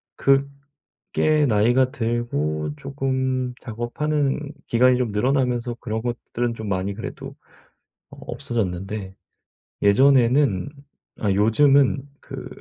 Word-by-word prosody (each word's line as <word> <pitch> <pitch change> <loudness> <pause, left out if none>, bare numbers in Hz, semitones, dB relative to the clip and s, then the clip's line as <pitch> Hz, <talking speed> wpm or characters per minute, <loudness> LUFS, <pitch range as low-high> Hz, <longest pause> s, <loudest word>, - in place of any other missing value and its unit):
그게 140 +2 0
나이가 120 +4 +3
들고 75 - -2
쪼끔 130 - -2
작업하는 135 +6 -1 0.3
기간이 125 +2 +4
좀 125 -4 -1
늘어나면서 125 +1 0
그런 110 -1 -3
것들은 120 0 -3
좀 110 -2 -6
많이 95 +1 -1
그래도 115 - -8 0.8
어 - - -14
없어졌는데. 95 -2 -4 0.7
예전에는 125 0 +4 0.5
아 105 -3 +1
요즘은 135 +6 +3
그 - - -8
120 Hz, 230 characters per minute, -23 LUFS, 105-135 Hz, 0.8 s, 기간이